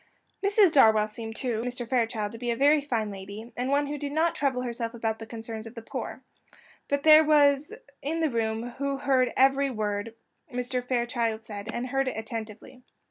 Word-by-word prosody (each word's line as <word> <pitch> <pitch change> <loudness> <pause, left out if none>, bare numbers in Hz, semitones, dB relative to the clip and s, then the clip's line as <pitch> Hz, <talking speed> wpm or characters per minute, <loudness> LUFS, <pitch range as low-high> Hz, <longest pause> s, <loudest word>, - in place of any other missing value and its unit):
Mrs. 400 -2 +5
Darwell 220 -6 +5
seemed 225 +1 -7
to 235 -3 -2
Mr. 245 0 -4
Fairchild 225 -4 0
to 230 - -8
be 240 0 -3
a 235 - +1
very 290 +4 +4
fine 230 -7 -2
lady, 200 +4 -9
and 250 +2 -2
one 285 +1 +2
who 290 +1 -4
did 285 0 -4
not 320 +3 +2
trouble 265 -3 0
herself 235 -1 -4
about 225 -1 -2
the 225 - -8
concerns 225 -1 -7
of 225 - -12
the 230 - -8
poor; - - -6 0.6
but 285 0 -1
there 310 0 +8
was 290 -2 +4
one - - -10 0.2
in 315 +4 -2
the 320 -3 +1
room 225 0 -1
who 280 0 -1
heard 260 -2 +2
every 270 +1 +4
word 215 -1 -3 0.3
which 250 -2 -4
Mr. 250 0 -2
Fairchild 235 -3 -1
said, 205 -1 -7
and 240 +2 -3
heard 270 +1 0
it 255 - -3
attentively. 225 +2 -7
245 Hz, 200 wpm, -27 LUFS, 225-280 Hz, 0.6 s, there